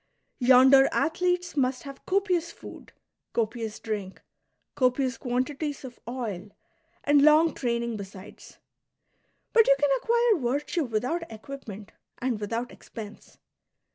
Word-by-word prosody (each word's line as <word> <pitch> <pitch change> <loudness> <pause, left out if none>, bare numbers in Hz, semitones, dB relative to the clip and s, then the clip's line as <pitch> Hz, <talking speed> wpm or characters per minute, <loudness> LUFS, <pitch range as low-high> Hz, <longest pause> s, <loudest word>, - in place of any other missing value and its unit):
Yonder 265 +2 +7
athletes 355 +1 0
must 255 -3 0
have 275 -1 -11
copious 365 -3 +1
food, - - -12 0.4
copious 225 -1 -2
drink, 205 -4 -5 0.5
copious 255 0 +1
quantities 270 +4 -3
of 245 -2 -10
oil, 215 -6 -5 0.5
and 290 0 +4
long 310 +2 +5
training 235 -2 -2
besides; 195 0 -11 1.0
but 455 -2 +6
you 275 - +6
can 290 -1 +2
acquire 455 - +2
virtue 300 +2 -2
without 250 +9 -1
equipment 220 -3 -9 0.3
and 245 -3 -2
without 230 +4 -3
expense. 215 -3 -11
255 Hz, 110 wpm, -27 LUFS, 230-300 Hz, 1.0 s, Yonder